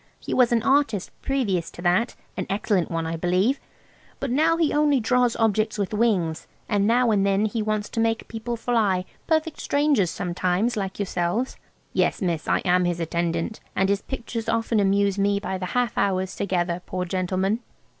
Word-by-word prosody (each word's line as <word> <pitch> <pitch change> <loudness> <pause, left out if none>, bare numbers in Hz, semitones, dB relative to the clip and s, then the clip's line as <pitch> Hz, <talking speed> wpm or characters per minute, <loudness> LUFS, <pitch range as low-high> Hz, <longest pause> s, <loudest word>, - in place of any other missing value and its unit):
He - - -5
was 250 -2 +4
an 230 -2 +2
artist 270 -8 +2
previous 200 -11 0
to - - -11
that–an 185 +7 -1
excellent 200 -3 0
one, 165 -1 -2
I 165 +1 -2
believe. 185 - +1 0.6
But 275 - -2
now 320 +5 +3
he 325 -3 +2
only 295 -2 +3
draws 245 +1 +2
objects 220 -1 +1
with 200 0 -2
wings–and 205 -1 0
now 240 +1 +3
and 200 -2 +3
then 200 +1 +2
he 215 +1 -1
wants 215 -1 -1
to 230 - -3
make 225 0 0
people 230 +1 -4
fly–perfect 235 - 0
strangers 285 - +2
sometimes, 180 +7 -1
like 195 -3 -3
yourselves. 195 +5 -1 0.4
Yes, - - +1
miss, 170 -4 -2
I - - +2
am 180 0 +3
his 175 -1 -1
attendant, 170 +4 -2 0.2
and 190 +1 +2
his 200 0 +1
pictures 230 -3 -5
often 230 -1 +1
amuse 200 0 +2
me 200 0 +2
by 190 -2 -4
the 185 - -3
half 245 -3 +1
hours 190 -1 0
together, 175 -2 -1
poor 185 0 -2
gentleman." 185 +3 0
205 Hz, 170 wpm, -24 LUFS, 185-235 Hz, 0.6 s, was